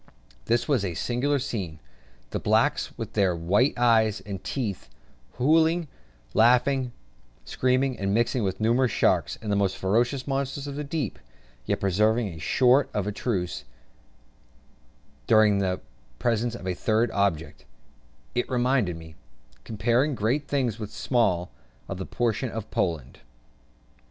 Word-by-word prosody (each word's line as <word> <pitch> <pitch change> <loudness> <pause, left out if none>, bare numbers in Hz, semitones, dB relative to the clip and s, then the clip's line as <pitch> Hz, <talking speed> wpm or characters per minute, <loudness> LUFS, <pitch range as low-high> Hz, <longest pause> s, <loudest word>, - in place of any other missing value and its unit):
This 120 +1 +1
was 135 -8 +2
a 90 -4 -3
singular 130 - 0
scene; 100 - -4 0.5
the - - -2
blacks - - +1
with - - -6
their 95 -4 +2
white 100 - +2
eyes 110 -4 +3
and 95 0 -7
teeth, 110 -9 -4 0.5
hallooing, 160 +4 +3 0.5
laughing, 125 +3 +3 0.5
screaming, 130 - 0
and 100 0 -1
mixing 120 +3 +1
with 95 -2 -2
numerous 120 +2 +2
sharks - - +1
the 105 -2 0
most 100 -2 +1
ferocious 120 +7 +1
monsters 140 0 -2
of 140 - -5
the 150 +1 -4
deep 140 - -3 0.5
yet - - 0
preserving 105 +3 +2
a 80 -3 -9
sort 125 - +3
of 105 0 -1
truce 90 - -2 1.6
during 105 -2 +5
the 95 -2 0 0.4
presence 115 - 0
of - - -9
a 95 - -1
third 110 +5 +1
object: 85 -7 -1 0.7
it 120 - -1
reminded 125 -8 +1
me, 80 -1 -11 0.5
comparing 120 - +1
great 125 +7 0
things 125 -6 -1
with 105 -2 -6
small, 95 - 0 0.4
of 95 - -5
the 95 - -5
partition 120 +1 -1
of 110 -1 -6
Poland. 75 -8 -2
115 Hz, 135 wpm, -26 LUFS, 95-130 Hz, 1.6 s, during